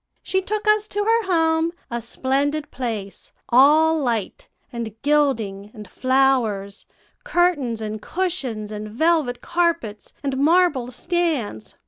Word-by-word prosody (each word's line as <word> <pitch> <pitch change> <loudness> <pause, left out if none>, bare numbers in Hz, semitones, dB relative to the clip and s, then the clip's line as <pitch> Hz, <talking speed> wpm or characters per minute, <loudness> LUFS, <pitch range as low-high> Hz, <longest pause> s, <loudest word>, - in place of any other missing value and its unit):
She 380 - 0
took 425 +2 -3
us 425 0 +3
to 415 -1 -2
her 455 +2 +2
home, 325 0 +2 0.2
a 235 0 -2
splendid 280 +5 -1
place, 220 -6 -5 0.2
all 310 +6 +5
light, 235 -7 -2 0.3
and 225 -2 -6
gilding, 230 -10 +1
and 210 -2 -10
flowers, 245 -5 0 0.4
curtains, 345 - +1
and 215 0 -5
cushions, 275 - -3
and 215 0 -6
velvet 295 +1 +1
carpets, 335 - -1
and 275 -2 -2
marble 295 -5 +3
stands. 285 - -2
270 Hz, 120 wpm, -22 LUFS, 220-335 Hz, 0.4 s, all